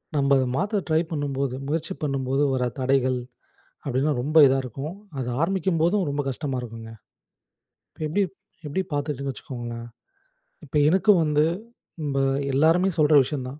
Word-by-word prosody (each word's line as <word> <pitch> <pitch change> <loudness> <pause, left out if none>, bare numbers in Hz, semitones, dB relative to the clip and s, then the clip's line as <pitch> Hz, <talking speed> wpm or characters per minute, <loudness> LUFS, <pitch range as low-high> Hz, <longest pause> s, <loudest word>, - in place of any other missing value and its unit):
நம்ம 140 -1 +2
அத 130 - +1
மாத்த 200 +2 0
ட்ரை 160 -1 +3
பண்ணும்போது 140 -4 -2
முயற்சி 165 +4 -2
பண்ணும்போது, 135 -1 0
வர 125 -1 0
தடைகள் 130 -1 +2 0.7
அப்படினா 135 +3 +1
ரொம்ப 150 +4 -3
இதா 135 +1 +3
இருக்கும். 135 +7 -6 0.2
அது 125 -2 -3
ஆரம்பிக்கும்போதும், 180 +1 +1
ரொம்ப 145 +1 -1
கஷ்டமா 135 0 -3
இருக்குங்க. 115 -1 -8 1.0
இப்போ - - -18
எப்படி 195 +7 +1 0.4
எப்படி 150 +6 -1
பார்த்துக்கிட்டேன்னு 145 -2 -2
வச்சுக்கோங்களேன். 120 -3 -7 0.8
இப்ப - - -10
எனக்கும் 190 +1 +4
வந்து, 150 -1 +2 0.6
இப்ப 140 -2 -1 0.3
எல்லாருமே 165 +7 +4
சொல்ற 155 -1 +4
விஷயம் 130 -1 -4
தான். 140 +3 -10
145 Hz, 135 wpm, -24 LUFS, 130-160 Hz, 1.0 s, எனக்கும்